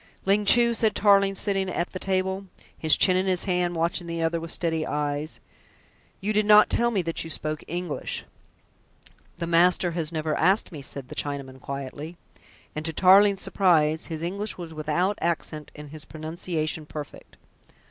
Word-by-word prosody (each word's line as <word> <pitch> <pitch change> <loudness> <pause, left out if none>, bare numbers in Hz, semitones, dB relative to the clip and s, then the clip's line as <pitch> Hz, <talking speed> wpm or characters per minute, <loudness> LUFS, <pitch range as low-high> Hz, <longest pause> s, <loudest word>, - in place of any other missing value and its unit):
"Ling 200 +2 +2
Chu," 235 +3 +5
said 220 -2 +1
Tarling, 200 -1 +4
sitting 195 -1 0
at 175 -1 -2
the 185 - -6
table, 190 +1 -1 0.3
his 155 -3 +3
chin 185 - +5
in 185 +1 +1
his 185 -2 0
hand, 180 -2 0
watching 170 +1 -1
the 165 0 -3
other 165 +1 0
with 165 0 -7
steady 160 -2 0
eyes, 150 0 -3 0.8
"you 210 +3 -2
did 210 0 +1
not 210 0 +7
tell 235 0 +3
me 200 -6 0
that 165 0 -2
you 165 - -8
spoke 155 -1 -4
English." 175 -1 -4 1.1
"The 170 - -3
master 175 +1 +3
has 165 -1 -2
never 155 -1 -2
asked 190 +6 +2
me," 150 -4 -8
said 135 -1 -7
the - - -7
Chinaman 140 -2 -4
quietly, 140 +4 -7 0.6
and 155 - -4
to 160 0 -3
Tarling's 195 +3 +5
surprise 160 -5 +2
his 160 -1 -5
English 200 +5 -2
was 170 -3 -8
without 160 +6 -1
accent 155 -3 -2
and 150 -1 -10
his 155 -1 -7
pronunciation 155 0 -4
perfect. 150 -1 -9
170 Hz, 170 wpm, -25 LUFS, 155-190 Hz, 1.1 s, not